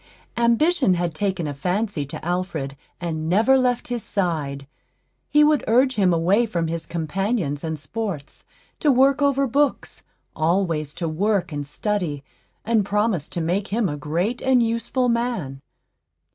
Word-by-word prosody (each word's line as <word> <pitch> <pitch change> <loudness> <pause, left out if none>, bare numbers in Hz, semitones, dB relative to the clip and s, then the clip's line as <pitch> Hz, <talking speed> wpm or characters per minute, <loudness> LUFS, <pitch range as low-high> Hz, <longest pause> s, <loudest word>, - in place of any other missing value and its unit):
Ambition 235 - +3
had 175 -1 -1
taken 190 0 -1
a 145 - -3
fancy 180 +1 -2
to 145 - -8
Alfred, 170 -6 -2 0.2
and 160 -2 -3
never 225 +9 +4
left 250 -2 +1
his 240 -1 -2
side. 155 -10 -2 0.6
He 300 0 +5
would 300 -1 +3
urge 255 +4 +4
him 195 -6 +3
away 185 +8 +3
from 170 -6 -1
his 165 0 -3
companions 170 - -2
and 160 -1 -3
sports, 155 0 -5 0.4
to 300 - +3
work 270 +2 +4
over 275 -1 +3
books, 280 +3 0 0.3
always 160 -3 0
to 165 0 -3
work 190 +4 0
and 145 -1 -4
study, 165 -4 -2 0.4
and 225 -1 +2
promised 205 -5 0
to 170 - -2
make 185 +5 -1
him 220 0 0
a 145 - -3
great 170 +11 -2
and 255 -2 +3
useful 230 +3 0
man. 235 - -1
190 Hz, 150 wpm, -23 LUFS, 160-235 Hz, 0.6 s, He